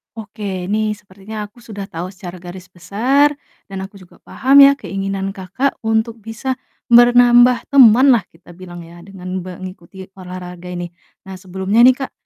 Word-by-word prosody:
Oke, 205 -4 -6
ini 215 +2 -1
sepertinya 205 +2 -10
aku 210 +4 -13
sudah 205 -4 -9
tahu 170 +2 -5
secara 185 -2 -10
garis 180 +1 -12
besar 250 - +1 0.3
dan 195 -1 -7
aku 195 +1 -12
juga 185 - -18
paham 270 +5 +4
ya 275 - +8
keinginan 195 0 -4
Kakak 195 +9 -3
untuk 220 0 -2
bisa 225 +4 -4 0.3
ber 240 -1 +6
nambah 245 0 +4
temanlah 255 -3 +5
kita 175 +1 -18
bilang 175 -1 -11
ya, 170 +1 -14
dengan 185 -1 -7
be 185 0 -10
ngikuti 185 0 -11
olahraga 180 -1 -9
ini. 175 -1 -5 0.4
Nah, 190 - -8
sebelumnya 190 +4 0
nih 255 +1 +6
Kak, 270 - -5
195 Hz, 160 wpm, -17 LUFS, 185-235 Hz, 0.4 s, ya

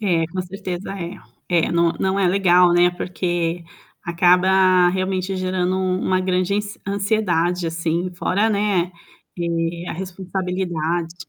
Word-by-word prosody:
É, 175 -6 +1
com 185 +3 -4
certeza 185 0 -6
é. 175 +2 -5 0.3
É, 170 -2 +2
não 170 0 +2
não 190 +1 +1
é 195 - +3
legal, 180 -2 +4
né, 175 0 +4
porque 175 -1 -2 0.4
acaba 180 +1 +4
realmente 185 +1 -1
gerando 185 0 -1
um 185 0 0
uma 185 0 +1
grande 185 +1 0 0.3
ansiedade 185 -4 0
assim 165 +2 -2
fora, 200 +5 +1
né, 200 -4 +1 0.5
eh, 170 0 -2
a - - -3
responsabilidade. 180 -2 -3
180 Hz, 130 wpm, -21 LUFS, 175-190 Hz, 0.5 s, legal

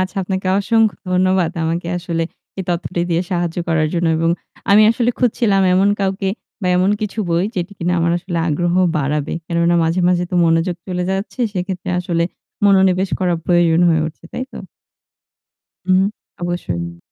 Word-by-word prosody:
আচ্ছা, 185 +2 -3
আপনাকে 190 0 -3
অসংখ্য 220 +1 +2 0.2
ধন্যবাদ 185 -2 +2
আমাকে 170 +1 -2
আসলে 170 -1 -2 0.4
এই 190 - -1
তথ্যটি 175 0 -2
দিয়ে 170 +1 +2
সাহায্য 175 -2 -1
করার 155 -2 +2
জন্য 170 -1 +1
এবং 165 +1 +1 0.4
আমি 210 +2 +7
আসলে 235 +1 +1
খুঁজছিলাম 220 -5 +2
এমন 195 +2 +4
কাউকে 195 0 -1 0.3
বা - - 0
এমন 185 +2 +3
কিছু 215 +1 -4
বই 170 +2 +1
যেটি 175 +2 -3
কিনা 175 +1 0
আমার 170 0 +2
আসলে 175 -1 -4
আগ্রহ 175 +3 0 0.2
বাড়াবে। 150 +1 -1
কেননা 170 0 +1
মাঝে, 165 +3 +1
মাঝে 180 -1 +2
তো 180 - -3
মনোযোগ 165 +2 +1
চলে 180 -1 -2
যাচ্ছে। 195 +6 -3
সেক্ষেত্রে 185 -1 -3
আসলে 170 -1 -1 0.4
মনোনিবেশ 190 -1 +4
করা 180 -2 +2
প্রয়োজন 175 -2 +3
হয়ে 160 -2 +3
উঠছে, 160 +1 -10
তাই 255 - -3
তো? - - -8 1.3
উহু। 185 0 +4 0.4
অবশ্যই। 85 - -3
180 Hz, 160 wpm, -18 LUFS, 170-190 Hz, 1.3 s, আমি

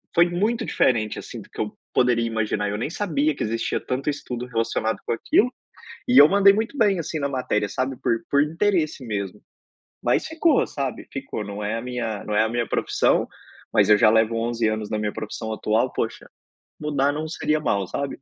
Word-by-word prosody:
foi 175 +1 +5
muito 220 +6 0
diferente, 110 -4 +1
assim, - - -8
do - - -16
que - - -13
eu 105 - -4 0.2
poderia 125 -2 +3
imaginar, 105 -2 -1
eu 105 - -2
nem 120 +7 -2
sabia 155 -6 0
que - - -3
existia 115 +1 -1
tanto 135 +3 -2
estudo 125 -4 -4
relacionado 115 -2 -1
com - - -2
aquilo. 245 - +2 0.5
E 250 - +4
eu 145 - +9
mandei 200 0 +6
muito 225 +7 -2
bem, 200 -6 +3
assim, 160 0 -3
na 140 - 0
matéria 125 -6 -1
sabe 130 +3 -2
por - - +2 0.2
por 140 - +4
interesse 165 -4 0
mesmo. 100 -2 -4 0.6
Mas - - +1
ficou, 320 -3 +3
sabe. 135 -3 -4
Ficou, 135 -6 -5
não 100 +1 -6
é 110 +2 -1
a 115 - -4
minha 120 -4 -3
não 105 - -3
é 110 - +5
a 110 - 0
minha 120 -1 -1
profissão, - - +1 0.5
mas - - +4
eu 105 - +7
já 110 - +6
levo 110 +1 +3
11 115 -1 0
anos 110 -1 -2
na 110 - -1
minha 105 -1 -2
profissão 110 +1 -5
atual, 110 +1 0
poxa, - - -3 0.5
mudar 145 -2 +1
não 155 +2 -3
seria 155 -1 0
mal, 100 -9 0
sabe? 140 +3 -4
125 Hz, 200 wpm, -23 LUFS, 110-155 Hz, 0.6 s, eu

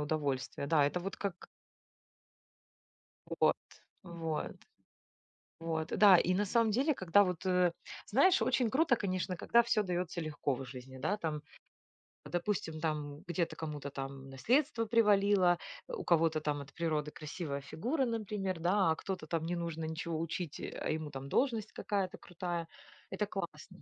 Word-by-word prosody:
удовольствие. 145 -3 -2
Да, 150 -1 +4
это 145 +5 +1
вот 195 +2 -5
как 190 -3 -4 1.8
Вот, - - +2 0.5
вот. 165 -3 -3 1.1
Вот, 160 -1 -2
да 200 -1 +7
и 180 +1 +2
на 205 +2 +1
самом 230 +2 +3
деле, 275 +8 +2
когда 190 -1 +4
вот, 180 -2 -2
э, 180 -2 +3 0.3
знаешь, 345 - +5
очень 250 -3 +2
круто, 275 -1 +3
конечно, 185 -3 -2
когда 235 +7 +4
всё 230 -2 +2
даётся 180 -2 -2
легко 150 -3 -1
в 135 - -6
жизни. 130 +1 -9
Да, 155 +10 0
там, 155 -5 -3 0.8
допустим, 175 -3 -2
там 150 -2 -2
где-то 170 -2 -1
кому-то 150 -3 -5
там 135 0 -6
наследство 235 - +2
привалило, 200 -5 +4 0.3
у - - -5
кого-то 165 -2 +3
там 150 -1 -1
от 135 -1 -12
природы 155 -3 -1
красивая 150 -2 -5
фигура, 235 - -1
например, 210 -6 -2
да, 180 +1 +3
а 160 - +2
кто-то 185 -4 -5
там 165 0 -1
не 175 - -1
нужно 170 -2 -3
ничего 160 0 -3
учить, 165 -1 -3
э, - - -4
а - - -1
ему 155 -1 -2
там 135 0 -7
должность 225 - +1
какая-то 195 -3 -2
крутая. 175 -1 -4 0.4
Это - - -1
классно! - - -7
170 Hz, 150 wpm, -33 LUFS, 155-200 Hz, 1.8 s, да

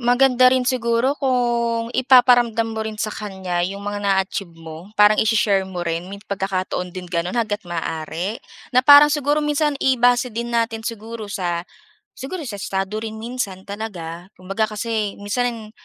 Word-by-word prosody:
maganda 255 +1 +5
rin 255 -1 +2
siguro 245 +1 +1
kung 235 -3 0
ipaparamdam 245 -3 +4
mo 220 - -4
rin 220 -1 -5
sa 215 - -2
kanya, 190 -4 -4
'yong 195 +3 -3
mga 205 0 -3
na-achieve 195 -2 0
mo. 165 +2 -10
Parang 210 +1 +5
ishi-share 210 -3 +2
mo 180 -2 -5
rin. 170 +2 -3
May 200 - -7
pagkakataon 185 -2 -3
din 185 -1 -6
gano'n, 175 +5 -2
hangga't 220 -2 -1
maaari 165 +4 -4 0.3
na 255 - +5
parang, 290 +1 +8
siguro, 295 0 +1
minsan 295 0 +1
i-base 245 -2 +2
din 235 +1 -4
natin 230 -1 0
siguro 225 -1 -6
sa, 175 -3 -2 0.5
siguro 320 +6 -6
sa 205 -3 -6
estado 195 +1 -3
rin 220 -1 -5
minsan 220 -6 -4
talaga. 180 -5 -6
Kumbaga 195 +4 -2
kasi 215 -2 -2
minsan 225 +1 -2
220 Hz, 155 wpm, -21 LUFS, 190-245 Hz, 0.5 s, parang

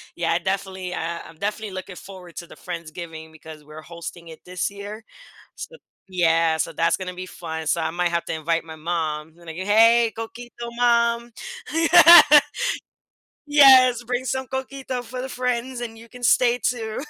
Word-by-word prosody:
Yeah, 170 -1 -1
I 170 - +1
definitely 190 -1 -4
uh, 170 0 -4
I'm 165 - -16
definitely 210 +1 -4
looking 185 0 -8
forward 180 -3 -12
to 170 -1 -7
the - - -14
Friendsgiving 165 -2 -8
because 155 -1 -13
we're 155 +1 -12
hosting 170 +1 -10
it 160 - -12
this 180 0 -3
year. 205 +2 -9 0.5
So 485 - -9 0.3
yeah, 165 -3 +2
so - - -2
that's 165 0 +1
gonna 185 -1 -6
be 185 +1 -7
fun. 160 -3 -7
So, 170 - +1
I 160 - -2
might 175 0 -1
have 170 0 -2
to - - -4
invite 165 +1 -1
my 160 -1 -10
mom, 155 -1 -4
like, 165 -2 -10
"Hey, 225 +4 +4
coquito, 240 +2 -8 0.3
mom." 235 -1 +1 0.4
Yeah. 335 +1 +8 1.3
"Yes, 260 -4 +6
bring 250 +2 -3
some 265 0 -3
coquito 265 -1 -5
for 250 +2 -7
the 265 - -6
friends 250 0 -3
and 225 -2 -7
you 230 0 -15
can 245 -1 -13
stay 245 +1 +3
too." 225 -3 -2
190 Hz, 170 wpm, -22 LUFS, 165-240 Hz, 1.3 s, Yeah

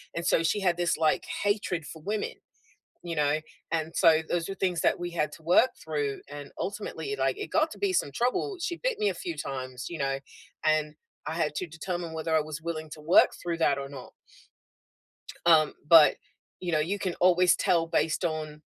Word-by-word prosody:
and 170 - -3
so 165 - +3
she 165 +6 +1
had 180 -3 +1
this, 175 -1 +1
like, 155 -1 +2 0.2
hatred 205 -5 0
for 160 +2 -10
women, 210 +5 -2 0.7
you 170 -1 -4
know? 150 0 +2 0.3
And 160 0 -1
so 160 -3 +5
those 170 -1 0
are - - -2
things 180 -4 0
that - - +2
we 175 0 -3
had 160 -3 -1
to 160 - -13
work 180 +10 +5
through, 145 -3 -2
and, 145 -1 -8
ultimately, 215 - -4
like, - - 0
it 415 - -4
got 315 0 +3
to - - -10
be 400 -2 +1
some 145 - +1
trouble, 250 - 0
she 345 0 -2
bit - - -1
me 420 -1 +2
a - - -2
few 345 -3 -5
times, 130 -1 -5
you 170 - -5
know, 135 -1 0 0.4
and 155 -1 +2 0.3
I - - -2
had 160 -3 0
to 185 - -3
determine 170 +1 -5
whether 160 0 -2
I - - +5
was 150 +1 -6
willing 160 -1 -4
to 155 - -9
work 160 +4 +5
through 170 -1 -2
that 145 -4 +2
or 140 0 -6
not. 140 -2 -10 1.3
Um, 160 -3 +5
but, 160 -2 +8 0.4
you 180 -1 -3
know, 155 - +2
you 185 +7 -1
can 185 -3 -2
always 180 0 +4
tell 170 -2 +2
based 165 +1 0
on, 155 -2 -4
165 Hz, 205 wpm, -28 LUFS, 155-185 Hz, 1.3 s, but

